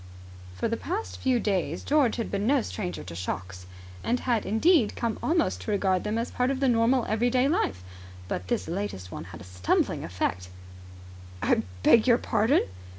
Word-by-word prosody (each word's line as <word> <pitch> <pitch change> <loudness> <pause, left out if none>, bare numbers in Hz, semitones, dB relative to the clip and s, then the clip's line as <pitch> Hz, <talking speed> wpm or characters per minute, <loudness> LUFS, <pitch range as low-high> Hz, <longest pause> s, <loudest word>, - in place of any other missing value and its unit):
For 90 - -1
the 230 - -1
past 405 +6 -4
few 255 -2 +2
days 185 -7 -1
George 280 -6 +3
had 230 - -3
been 200 +1 -1
no 275 -2 +3
stranger 185 -5 -5
to - - -8
shocks, 90 +1 -5 0.4
and 245 +2 0
had 235 -4 0
indeed 225 - +3
come 230 -3 -2
almost 330 +1 +1
to 215 - -4
regard 190 -3 +1
them 210 +1 -1
as 230 +1 -2
part 250 +1 0
of 275 -1 -1
the 275 - +2
normal 240 +1 +3
everyday 245 +4 +2
life; 95 - 0 0.4
but 90 0 -4
this - - -1
latest 165 - -4
one 80 - -6
had 90 -2 -11
a - - -9
stumbling 90 0 0
effect. 90 +1 -3 0.9
"I - - +3 0.2
beg 230 +1 +6
your 235 -2 +6
pardon?" 225 +2 +2
220 Hz, 180 wpm, -27 LUFS, -, 0.9 s, beg